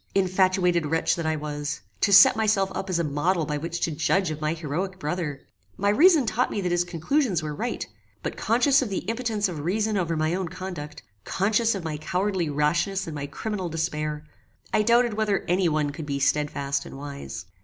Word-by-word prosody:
Infatuated 185 -3 +2
wretch 165 +2 +1
that 165 -2 -3
I 160 - +1
was! 150 0 -4 0.2
To 200 - +2
set 195 0 +9
myself 210 -3 +1
up 195 - -4
as 180 - +1
a 170 - +1
model 155 +3 0
by 150 0 -2
which 170 +2 -4
to 165 - 0
judge 165 +4 +1
of 155 0 -6
my 155 +1 0
heroic 175 +4 -3
brother! 150 -3 -3 0.4
My 200 +1 +1
reason 305 - +5
taught 235 +3 +1
me - - -3
that 180 -2 -1
his 175 0 +2
conclusions 175 - 0
were 150 -1 -3
right; 230 +10 -3 0.4
but - - -3
conscious 250 +5 +3
of 255 - -2
the 195 - -3
impotence 225 -2 0
of 170 -5 -5
reason 210 +7 0
over 170 -3 -1
my 155 +1 +1
own 185 0 -1
conduct; 175 -4 -7 0.2
conscious 215 - +1
of 190 - -5
my 155 -2 -3
cowardly 180 +2 -1
rashness 175 +7 0
and 160 - -6
my 145 -1 -4
criminal 190 +4 -4
despair, 155 -2 -3 0.5
I 215 - +4
doubted 235 +1 +3
whether 210 -2 0
any 180 0 +2
one 150 -2 0
could 145 +1 -7
be 140 -1 -1
stedfast 140 0 0
and - - -10
wise. 135 - -7
175 Hz, 200 wpm, -25 LUFS, 150-200 Hz, 0.5 s, set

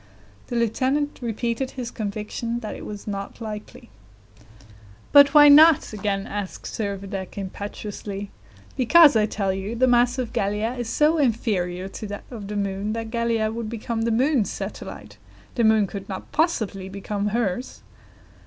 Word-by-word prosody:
The 240 - -5
lieutenant 260 +6 0
repeated 235 +2 -2
his 245 -1 -4
conviction 215 +2 -4
that 215 - -5
it - - -8
was 205 -1 -8
not 200 0 -5
likely. 215 - -8 1.2
"But 285 0 +7
why 295 0 +9
not?" 300 -2 +7
again 200 -1 -2
asked 205 -2 -6
Servadac 200 -2 -5
impetuously. 200 0 -6 0.4
"Because, 290 +3 +6
I 215 -1 +3
tell 195 -3 -1
you, 195 +4 -4
the 255 +2 +3
mass 245 0 +3
of 245 -3 -3
Gallia 210 +4 -1
is 240 -3 -4
so 305 +6 +3
inferior 190 -8 0
to 210 +2 -7
that 205 0 -7
of 215 -5 -7
the 210 - -5
moon, 200 +1 -2
that 225 -1 -5
Gallia 230 -2 0
would 225 -1 -4
become 230 0 -3
the 230 - +1
moon's 250 0 +2
satellite; - - -7 0.4
the 235 - 0
moon 220 -1 +4
could 195 +1 -8
not 190 - -7
possibly 220 - 0
become 200 +1 -3
hers." 225 +1 -2
220 Hz, 155 wpm, -24 LUFS, 200-245 Hz, 1.2 s, why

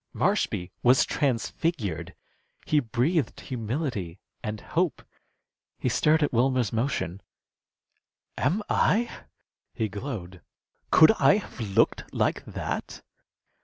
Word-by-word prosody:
Marshby 90 +1 0
was 125 +2 +5
transfigured. 115 - -1 0.5
He 150 - +3
breathed 135 +6 0
humility 115 - -3 0.3
and 105 0 -4
hope. 170 - -1 0.7
He - - -1
stirred 155 +1 +3
at 145 - 0
Wilmer's 125 -2 +2
motion. 110 -6 -1 1.1
"Am 210 +4 0
I" 235 +2 +2 0.6
he 110 - -1
glowed 100 - -6 0.5
"could 160 - +8
I - - +6
have 205 - -8
looked 100 -4 +1
like - - +1
that?" - - -5
125 Hz, 100 wpm, -27 LUFS, 100-150 Hz, 1.1 s, could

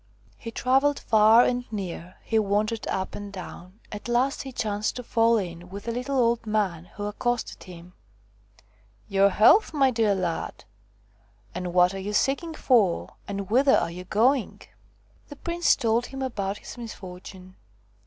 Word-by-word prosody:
He 230 - -8
travelled 270 +5 +2
far 220 +2 +5
and 245 -1 -2
near, 185 -3 -6
he 225 - +1
wandered 215 +2 -1
up 190 0 -3
and 205 -1 -7
down. 185 +1 -10
At 210 +2 -7
last 245 +3 +1
he 270 - -7
chanced 210 -3 -2
to 250 - -6
fall 230 0 +3
in 175 -3 -5
with 200 +3 -9
a - - 0
little 250 +3 -2
old 235 -2 +1
man 195 -6 -1
who 205 - -5
accosted 240 +3 -3
him: 180 -1 -12 0.6
" 105 -1 -30 0.3
Your 195 0 +4
health, 305 - +5
my 270 -2 +4
dear 220 -4 +2
lad! 175 -3 -4 0.9
and 180 0 -4
what 180 +1 +4
are 195 - -5
you 205 +2 -4
seeking 295 +9 0
for, 220 - +2
and 200 0 -5
whither 270 +3 +5
are - - -1
you 180 +1 -8
going 240 +6 +1
1 - - -15 0.3
' - - -35
The 290 - -9
prince 340 +3 +1
told 230 +1 0
him 270 0 -6
about 200 -6 -3
his - - -11
misfortune. 185 -4 -10
215 Hz, 170 wpm, -25 LUFS, 190-245 Hz, 0.9 s, far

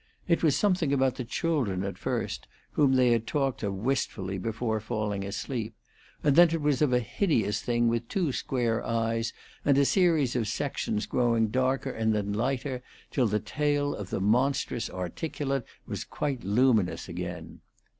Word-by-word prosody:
It 170 -2 +2
was 155 -4 +3
something 180 -3 +2
about 135 -2 +2
the 125 - -2
children 120 - -1
at 100 0 -3
first, - - -3 0.2
whom 140 -3 +3
they 125 -2 +4
had 115 -1 +1
talked 135 -3 0
of 100 -3 -2
wistfully 100 -4 -2
before 110 +2 -1
falling 105 -2 -2
asleep, 110 +3 -4 0.5
and 145 -2 +4
then 175 +1 +8
it 165 0 -1
was 145 -2 +1
of 150 -4 +3
a 125 - +4
hideous 115 - 0
thing 120 0 +1
with 115 0 0
two 175 -3 0
square 120 -3 -1
eyes 115 0 0 0.3
and 140 -1 +4
a 140 - +5
series 160 -8 +3
of 115 -4 0
sections 110 -3 -2
growing 115 -3 +2
darker 130 +3 0
and 110 -2 0
then 100 -1 -1
lighter, 130 +3 -1 0.3
till 125 -4 +2
the 105 0 +1
tail 145 +6 0
of 100 -3 -6
the - - -2
monstrous 120 +3 +1
articulate 135 - -3 0.2
was - - -4
quite 140 -5 -3
luminous 105 -1 +2
again. 90 -1 -6
120 Hz, 165 wpm, -28 LUFS, 105-140 Hz, 0.5 s, then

